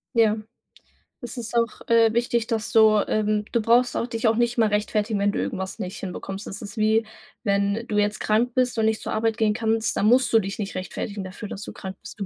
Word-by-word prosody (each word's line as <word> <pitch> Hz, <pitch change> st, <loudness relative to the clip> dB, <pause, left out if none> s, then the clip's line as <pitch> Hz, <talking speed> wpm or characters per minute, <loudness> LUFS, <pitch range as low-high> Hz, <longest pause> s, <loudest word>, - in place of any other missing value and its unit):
Ja, 220 Hz, -2 st, +4 dB, 0.8 s
es 245 Hz, +1 st, -7 dB
ist 235 Hz, 0 st, -5 dB
auch, 230 Hz, -1 st, -1 dB
äh, 230 Hz, -1 st, +5 dB
wichtig, 235 Hz, -1 st, 0 dB
dass 225 Hz, -3 st, -2 dB
du 220 Hz, -2 st, +6 dB
ähm, 210 Hz, -1 st, 0 dB
du 235 Hz, -, +1 dB
brauchst 240 Hz, +3 st, +3 dB
auch 235 Hz, -, -1 dB
dich 230 Hz, -1 st, -1 dB
auch 225 Hz, -, +3 dB
nicht 240 Hz, +1 st, +1 dB
immer 220 Hz, -3 st, +3 dB
rechtfertigen, 210 Hz, 0 st, 0 dB
wenn 200 Hz, 0 st, +2 dB
du -, -, -4 dB
irgendwas 190 Hz, +1 st, -3 dB
nicht 190 Hz, -4 st, -5 dB
hinbekommst. 195 Hz, +1 st, -6 dB
Es 200 Hz, -, -7 dB
ist 210 Hz, +2 st, -8 dB
wie, 220 Hz, +1 st, +2 dB, 0.4 s
wenn 200 Hz, +1 st, 0 dB
du 210 Hz, -, -1 dB
jetzt 210 Hz, +1 st, 0 dB
krank 230 Hz, +3 st, +1 dB
bist 250 Hz, -2 st, +1 dB
und 220 Hz, -, +2 dB
nicht 220 Hz, 0 st, +1 dB
zur -, -, -4 dB
Arbeit 225 Hz, 0 st, 0 dB
gehen 220 Hz, -2 st, +2 dB
kannst, 225 Hz, 0 st, 0 dB
dann 205 Hz, -, +2 dB
musst 250 Hz, +2 st, +4 dB
du 225 Hz, -, +7 dB
dich 195 Hz, -1 st, -4 dB
nicht 200 Hz, -2 st, -4 dB
rechtfertigen 195 Hz, +2 st, -5 dB
dafür, 185 Hz, +3 st, -7 dB
dass 200 Hz, -, -7 dB
du -, -, -7 dB
krank 190 Hz, -1 st, -8 dB
bist. -, -, -11 dB
Du 200 Hz, -, -2 dB
220 Hz, 235 wpm, -24 LUFS, 205-230 Hz, 0.8 s, du